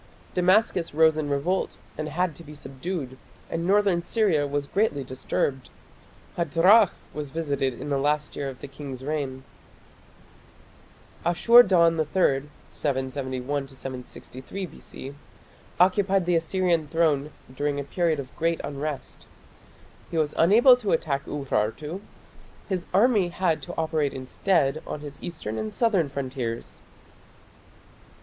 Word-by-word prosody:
Damascus 180 -2 +2
rose 160 0 +5
in 155 -2 -2
revolt 165 +7 -1 0.2
and 155 0 -4
had 175 +2 0
to 170 - -10
be 150 -1 -11
subdued, 135 -1 -5 0.3
and 170 +1 -2
northern 195 -3 +3
Syria 170 -7 +1
was 145 0 -2
greatly 170 -5 0
disturbed. 130 +1 -2 0.7
Hadrach 180 +5 +5 0.2
was 150 -2 -5
visited 140 -5 -2
in - - -5
the 140 - +1
last 150 +1 0
year 140 -1 -3
of 130 - -10
the - - -6
king's 135 -2 -8
reign. 135 -3 -3 1.8
Ashur 230 +8 +7
dan 170 -6 +4
III 150 -3 +1 0.2
(771 130 0 -2
763 130 +6 -7
B.C.) 140 -5 -10 0.7
occupied 190 +1 +3
the 175 0 +2
Assyrian 170 -1 +1
throne 150 -2 +1 0.3
during 145 +1 -1
a - - -2
period 160 +2 0
of 135 -2 -8
great 165 0 0
unrest. 145 0 -5 0.8
He 165 - -3
was 150 -2 +1
unable 230 +9 +7
to 215 -5 -1
attack 140 -3 0
Urartu. 145 - -2 0.7
His 185 -3 -2
army 205 -1 +4
had 170 -2 0
to 175 - -8
operate 155 -3 0
instead 140 +2 +1
on 150 - -5
his 145 -1 -9
eastern 110 -11 -5
and 110 0 -3
southern 200 - +2
frontiers. 130 -4 -4
155 Hz, 130 wpm, -26 LUFS, 140-180 Hz, 1.8 s, Ashur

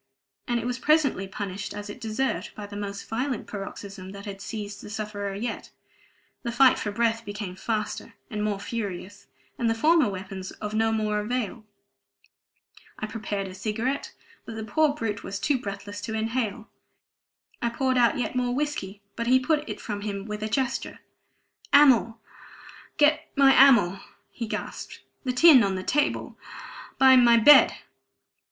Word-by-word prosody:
And 240 0 0
it - - -5
was 250 +1 -2
presently 285 -10 +2
punished 200 +1 -5
as 205 0 -6
it 205 - -9
deserved, 225 +5 -2
by 210 - -7
the 205 0 -10
most 200 -1 -6
violent 250 +2 -2
paroxysm 195 -1 -8
that 200 +1 -9
had 195 -1 -7
seized 210 -1 -6
the - - -10
sufferer 205 -2 -4
yet: 225 +3 -5 0.7
the 235 - -3
fight 260 +2 +5
for 210 - -3
breath 230 +1 0
became 205 -3 -6
faster 215 +1 -4
and 210 -3 -4
more 210 -2 -1
furious, 205 -2 -6 0.3
and 235 - +1
the 225 - +1
former 310 +1 +4
weapons 190 -1 -6
of 210 0 -6
no 225 +1 +2
more 215 -1 0
avail. 220 0 -3 1.3
I - - -4
prepared 210 -3 -4
a 185 - -9
cigarette, 230 +8 -3 0.3
but 225 - -8
the 220 - -5
poor 290 +7 +2
brute 210 -8 -3
was 200 - -4
too 275 +4 +1
breathless 205 -1 -7
to 220 +1 -4
inhale. 225 0 -2 0.9
I 235 - +1
poured 260 +2 0
out 235 -1 +3
yet 250 - -2
more 245 -1 0
whiskey, 210 -9 -3
but 235 0 -3
he 260 +1 +5
put 300 +3 0
it - - -5
from 205 -2 -5
him 200 -1 -4
with 210 -1 -5
a 215 - -2
gesture. 265 +2 -2 0.8
"Amyl 255 -6 +5 0.8
get 305 +1 +3
me 275 -1 +6
amyl!" 235 -10 +6 0.3
he 230 - -5
gasped. - - -6 0.2
"The 255 - +1
tin 270 +1 +7
on 195 -3 +1
the 185 - -4
table 295 +7 -1 0.6
by 265 -1 +7
my 240 -2 +6
bed." 290 +6 +8
220 Hz, 165 wpm, -26 LUFS, 205-250 Hz, 1.3 s, bed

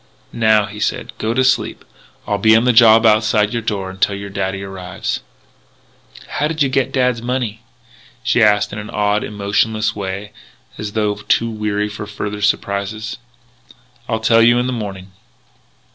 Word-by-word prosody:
"Now," 110 -2 +3
he 105 +1 -9
said, - - -2
"go 110 +2 -1
to 130 - +3
sleep. 130 0 0 0.4
I'll 105 -1 -1
be 110 +2 +5
on 115 - +4
the 125 - +4
job 115 0 +7
outside 110 0 +3
your 120 - -1
door 100 -4 -3
until 95 +1 0
your 100 0 -7
daddy 95 0 -3
arrives." 95 -2 -5 1.1
"How 150 - -1
did 155 -1 0
you 135 - +1
get 130 -1 +1
back 135 - -18
dad's 125 -3 +1
money?" 120 -3 -3 0.6
she 125 -1 +2
asked 105 -2 +3
in 105 - -5
an 105 - -8
odd, 105 0 0
emotionless 105 +1 0
way 100 +1 -5 0.4
as 105 -1 -6
though 105 -2 +1
too 115 +2 0
weary 105 -1 -1
for 105 0 -7
further 105 0 -5
surprises. 105 +2 -1 0.9
"I'll 115 -2 0
tell 115 +1 +4
you 120 +1 +5
in 125 - +1
the 130 - -2
morning." 100 -4 -6
105 Hz, 170 wpm, -18 LUFS, 100-115 Hz, 1.1 s, job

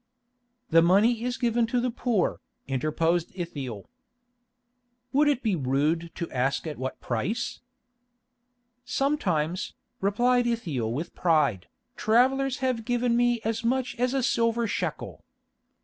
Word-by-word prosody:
"The 165 +1 +7
money 210 +7 +4
is 245 0 -2
given 235 -1 +1
to 245 +2 0
the 245 0 0
poor," 230 -5 0 0.3
interposed 155 +5 0
Ithiel. 140 - -5 1.3
"Would 295 +2 +4
it 280 -3 +1
be 215 -5 +1
rude 150 +4 0
to 170 - -5
ask 135 +4 0
at 155 -4 -5
what 130 0 -4
price?" 195 - -2 1.2
"Sometimes," 185 - -1 0.2
replied 240 +5 +2
Ithiel 155 - -1
with 145 +8 -4
pride, 150 - +1 0.3
"travellers 260 +4 +2
have 250 -3 0
given 240 0 +1
me 240 -1 +2
as 225 +1 -1
much 255 +2 0
as 250 +2 +1
a 265 - +1
silver 230 -1 +1
shekel. 220 - -4
220 Hz, 125 wpm, -27 LUFS, 160-245 Hz, 1.3 s, The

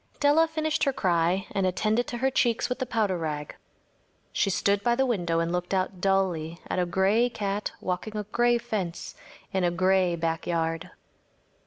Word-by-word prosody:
Della 295 +3 +4
finished 315 -1 -1
her 275 - +1
cry 180 -2 +1
and 195 -1 +1
attended 215 +6 +1
to 240 - -4
her 265 +2 +1
cheeks 235 -3 +1
with 250 - -2
the 260 - -2
powder 210 -6 0
rag. 150 -2 -4 0.8
She 195 - +1
stood 200 +1 +1
by 235 +2 +2
the 265 +2 +2
window 175 -9 0
and 165 0 0
looked 180 +2 -1
out 185 -1 -2
dully 180 -4 0
at - - -1
a 180 - +1
gray 195 +7 +2
cat 205 -3 -3
walking 185 +4 -3
a 210 - -2
gray 240 +3 +2
fence 210 -8 -4 0.4
in 190 -1 +1
a 175 - +3
gray 185 0 +2
backyard. 165 +1 -2
195 Hz, 175 wpm, -27 LUFS, 175-235 Hz, 0.8 s, Della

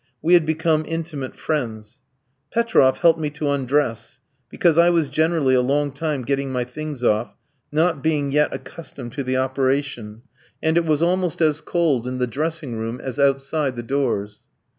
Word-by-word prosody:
We 170 +3 +2
had 170 -3 +5
become 160 0 +1
intimate 160 -5 -4
friends. 115 -8 -4 0.5
Petroff 225 - +3
helped 165 -2 +5
me 150 -1 -1
to 150 -1 -2
undress, 135 -3 -1 0.3
because 170 -3 +2
I 170 +1 +6
was 165 -5 +2
generally 160 -4 +2
a 130 - +4
long 145 +3 0
time 145 -1 -3
getting 140 +1 -1
my 125 -1 -1
things 140 +1 -7
off, 110 0 +1 0.4
not 160 0 +1
being 150 -3 0
yet 150 +1 +2
accustomed 135 -7 -8
to 140 - -3
the 130 0 -1
operation; 130 -4 -1 0.4
and 160 0 +1
it 170 -1 +3
was 155 0 +1
almost 180 -1 0
as 155 -2 +2
cold 150 -9 0
in 130 0 -3
the 125 - +1
dressing 145 -2 -3
room 115 +2 -4
as 130 +2 -6
outside 140 0 +1
the 120 - -5
doors. 115 -6 -1
145 Hz, 170 wpm, -22 LUFS, 130-160 Hz, 0.5 s, I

